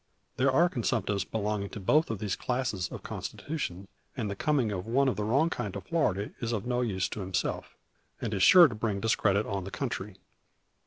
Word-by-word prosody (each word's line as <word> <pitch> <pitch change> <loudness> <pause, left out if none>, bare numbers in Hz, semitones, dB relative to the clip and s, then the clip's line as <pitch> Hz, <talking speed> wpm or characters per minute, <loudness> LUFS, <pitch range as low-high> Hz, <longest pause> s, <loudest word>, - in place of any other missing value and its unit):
There 130 +1 +3
are 170 +7 +5
consumptives 105 - -1
belonging 105 -1 -2
to - - -7
both 150 - +3
these 105 -2 -2
classes 125 -8 -2
of - - -8
constitution; 100 - -5 0.3
and 110 -5 -2
the - - -4
coming 130 -1 +1
of 95 0 -4
one 135 +4 +3
of 130 - +1
the 105 - -2
wrong 140 +10 +2
kind 105 - -3
to 100 - -4
Florida 100 - 0
is 115 -1 -2
of 105 -3 -2
no 125 0 0
use 100 -6 0
to - - -6
himself, 95 -1 -3 0.4
and 110 - -3
is 95 - -1
sure 175 - +9
to 125 - -6
bring 105 -2 -2
discredit 105 -1 +2
on 100 -2 -3
the 95 - -6
country. 105 -5 -4
110 Hz, 200 wpm, -29 LUFS, 100-130 Hz, 0.4 s, sure